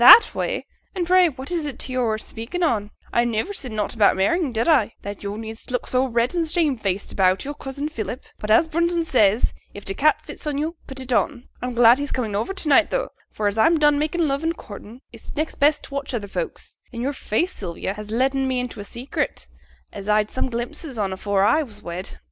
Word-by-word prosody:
'"That 460 Hz, -, +10 dB
way?" -, -, -2 dB, 0.3 s
and 360 Hz, -2 st, 0 dB
pray 365 Hz, 0 st, +5 dB
what 270 Hz, +2 st, -7 dB
is 335 Hz, -3 st, -1 dB
t' -, -, -1 dB
way 260 Hz, 0 st, -5 dB
yo're 235 Hz, -4 st, +1 dB
speaking 230 Hz, +11 st, -5 dB
on? 215 Hz, -10 st, +1 dB, 0.2 s
I 235 Hz, -, +4 dB
niver 235 Hz, -, -1 dB
said 265 Hz, -, -5 dB
nought 210 Hz, -1 st, -2 dB
about 215 Hz, -4 st, +4 dB
marrying, 295 Hz, -, +1 dB
did 230 Hz, +4 st, 0 dB
I, 260 Hz, -10 st, +3 dB
that 200 Hz, 0 st, -6 dB
yo' 200 Hz, 0 st, -4 dB
need 220 Hz, 0 st, -6 dB
look 250 Hz, 0 st, -1 dB
so 255 Hz, +1 st, +2 dB
red 235 Hz, +2 st, +1 dB
and 335 Hz, -2 st, 0 dB
shamefaced 260 Hz, -, 0 dB
about 185 Hz, +2 st, +2 dB
yo'r 290 Hz, -, -3 dB
cousin 280 Hz, +1 st, -5 dB
Philip? 245 Hz, -3 st, -5 dB, 0.2 s
But, 210 Hz, -, -5 dB
as 225 Hz, +9 st, +5 dB
Brunton 340 Hz, +1 st, +1 dB
says, 220 Hz, -6 st, +3 dB, 0.2 s
if 205 Hz, -, -9 dB
t' 195 Hz, -, -2 dB
cap 305 Hz, +5 st, +2 dB
fits -, -, -7 dB
yo', 300 Hz, +3 st, -1 dB
put 270 Hz, -1 st, -6 dB
it 260 Hz, -1 st, -3 dB
on. 245 Hz, 0 st, 0 dB
I'm 250 Hz, -1 st, -3 dB
glad 240 Hz, +2 st, +7 dB
he's 285 Hz, 0 st, -3 dB
comin' 225 Hz, -5 st, -2 dB
to 310 Hz, -, -2 dB
night 300 Hz, +2 st, +5 dB
tho', -, -, -1 dB, 0.2 s
for 215 Hz, -, -3 dB
as 205 Hz, +2 st, +1 dB
I'm 325 Hz, +8 st, +5 dB
done 295 Hz, -1 st, +4 dB
makin' 315 Hz, +2 st, +1 dB
love 275 Hz, 0 st, 0 dB
and 330 Hz, 0 st, 0 dB
courtin', 215 Hz, +4 st, -10 dB
it's 230 Hz, -, -11 dB
next 310 Hz, +2 st, -2 dB
best 295 Hz, +1 st, +4 dB
t' -, -, -9 dB
watch 280 Hz, -2 st, -3 dB
other 205 Hz, -3 st, -3 dB
folks; 475 Hz, -, -5 dB
an' 235 Hz, -1 st, -5 dB
yo'r 275 Hz, +3 st, -1 dB
face, 285 Hz, -, -1 dB
Sylvia, 185 Hz, 0 st, -4 dB
has 210 Hz, 0 st, -8 dB
letten 265 Hz, +4 st, +1 dB
me 260 Hz, -1 st, 0 dB
into 250 Hz, -3 st, -5 dB
a -, -, -5 dB
secret, 240 Hz, +6 st, -3 dB, 0.5 s
as 200 Hz, 0 st, -6 dB
I'd 210 Hz, 0 st, +3 dB
some 260 Hz, -, -1 dB
glimpses 245 Hz, +3 st, -5 dB
on 195 Hz, -3 st, -1 dB
afore 195 Hz, +1 st, +1 dB
I 300 Hz, +10 st, +4 dB
was 215 Hz, -8 st, -8 dB
wed.' 175 Hz, +2 st, -6 dB
250 Hz, 225 wpm, -23 LUFS, 215-300 Hz, 0.5 s, That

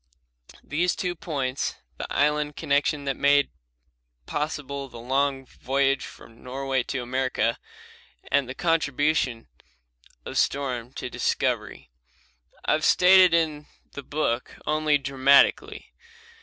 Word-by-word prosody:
These 175 Hz, +5 st, 0 dB
two 180 Hz, -1 st, -2 dB
points, 140 Hz, -7 st, -3 dB, 0.2 s
the -, -, -6 dB
island 150 Hz, 0 st, +1 dB
connection 145 Hz, 0 st, 0 dB
that 135 Hz, -1 st, -1 dB
made 145 Hz, +1 st, +3 dB, 0.7 s
possible 140 Hz, -, -4 dB
the 120 Hz, -, -11 dB
long 135 Hz, +2 st, 0 dB
voyage 135 Hz, +2 st, 0 dB
from 115 Hz, 0 st, -15 dB
Norway 135 Hz, +1 st, -2 dB
to 130 Hz, +1 st, -4 dB
America, 130 Hz, -2 st, -1 dB, 0.7 s
and 140 Hz, -3 st, +2 dB
the 130 Hz, -, -6 dB
contribution 145 Hz, -7 st, 0 dB, 0.8 s
of -, -, -2 dB
storm 125 Hz, -4 st, -1 dB
to -, -, -5 dB
discovery, -, -, -2 dB, 0.7 s
I -, -, +2 dB
have -, -, +1 dB
stated 185 Hz, -1 st, +6 dB
in 155 Hz, -3 st, -1 dB, 0.2 s
the 140 Hz, -, -7 dB
book 140 Hz, -4 st, -2 dB
only 155 Hz, -1 st, +2 dB
dramatically. 140 Hz, 0 st, +2 dB
140 Hz, 115 wpm, -25 LUFS, 130-150 Hz, 0.8 s, stated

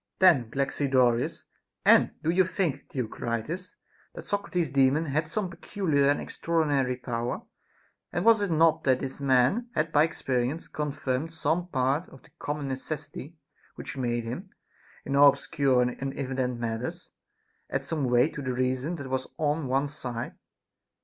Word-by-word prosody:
11. 160 Hz, -12 st, +5 dB
Then -, -, -21 dB
Galaxidorus: 130 Hz, -3 st, +1 dB, 0.4 s
And -, -, +6 dB
do 160 Hz, -, +2 dB
you 185 Hz, +2 st, +4 dB
think, 170 Hz, -6 st, -2 dB
Theocritus, 125 Hz, -, -4 dB, 0.4 s
that -, -, -7 dB
Socrates's 180 Hz, -7 st, -1 dB
Daemon 140 Hz, +3 st, +3 dB
had 155 Hz, +2 st, -1 dB
some 200 Hz, +4 st, -2 dB
peculiar 165 Hz, -6 st, 0 dB
and 145 Hz, -, +2 dB
extraordi 165 Hz, -2 st, -1 dB
nary 130 Hz, -3 st, +1 dB
power 120 Hz, -1 st, -3 dB, 0.3 s
% -, -, -39 dB
And 175 Hz, -, -1 dB
was 225 Hz, -2 st, +6 dB
it 200 Hz, -, 0 dB
not 160 Hz, -1 st, +3 dB
that 130 Hz, -2 st, +4 dB
this 135 Hz, +1 st, -5 dB
man 135 Hz, -, +3 dB
had 155 Hz, +1 st, 0 dB
by 150 Hz, +1 st, +5 dB
experi 125 Hz, -6 st, -1 dB
ence 160 Hz, +4 st, -6 dB
confirmed 150 Hz, 0 st, -2 dB
some 165 Hz, +2 st, 0 dB
part 135 Hz, +2 st, 0 dB
of 135 Hz, -, -15 dB
the -, -, -20 dB
common 145 Hz, -1 st, -3 dB
necessity 145 Hz, +3 st, -5 dB, 0.4 s
which -, -, -7 dB
made 120 Hz, -3 st, -1 dB
him, 145 Hz, -, -6 dB, 0.6 s
in 140 Hz, -, -1 dB
all 140 Hz, 0 st, +9 dB
obscure 135 Hz, -2 st, +2 dB
and 125 Hz, 0 st, -1 dB
inevident 130 Hz, -2 st, -2 dB
matters, 115 Hz, +1 st, -4 dB, 0.6 s
add -, -, -2 dB
some 155 Hz, -4 st, -1 dB
weight 125 Hz, +4 st, +3 dB
to 150 Hz, -, -5 dB
the 130 Hz, -2 st, -2 dB
reason 130 Hz, +6 st, -1 dB
that 140 Hz, -4 st, -7 dB
was 130 Hz, 0 st, -2 dB
on 150 Hz, -1 st, 0 dB
one 135 Hz, +3 st, +1 dB
side 125 Hz, -5 st, -5 dB
140 Hz, 165 wpm, -28 LUFS, 130-160 Hz, 0.6 s, all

